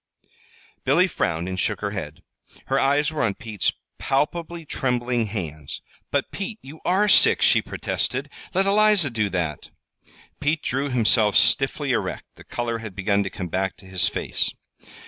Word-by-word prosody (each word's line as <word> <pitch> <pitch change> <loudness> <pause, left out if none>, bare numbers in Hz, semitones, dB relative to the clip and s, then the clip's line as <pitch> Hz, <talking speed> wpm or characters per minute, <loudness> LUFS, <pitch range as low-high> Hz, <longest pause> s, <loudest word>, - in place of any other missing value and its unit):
Billy 150 +7 +4
frowned 85 - -1
and 95 0 -3
shook 105 -1 0
her 100 -1 -2
head. 80 -7 -6 0.4
Her 135 +1 +1
eyes 145 +3 +2
were 155 - -2
on 100 -4 +1
Pete's 110 -5 -1 0.3
palpably 165 +4 -1
trembling 125 -4 0
hands. 80 -8 -5 0.3
"But, - - -1
Pete, 210 +2 -5
you 150 +4 -11
are 195 +4 +3
sick," - - +6
she - - +5
protested. - - -2 0.3
"Let 190 +1 +3
Eliza 205 -6 +4
do 110 -3 0
that." 85 -6 -3 0.7
Pete 150 +1 0
drew 135 +2 -1
himself 110 -4 +3
stiffly - - +3
erect. - - -2
The - - -15
color 120 -1 -3
had 110 -4 -8
begun 100 +1 +1
to 100 - -2
come 90 -3 -6
back 95 +2 -1
to 95 - -16
his 95 -1 0
face. - - -1
115 Hz, 160 wpm, -24 LUFS, 95-150 Hz, 0.7 s, sick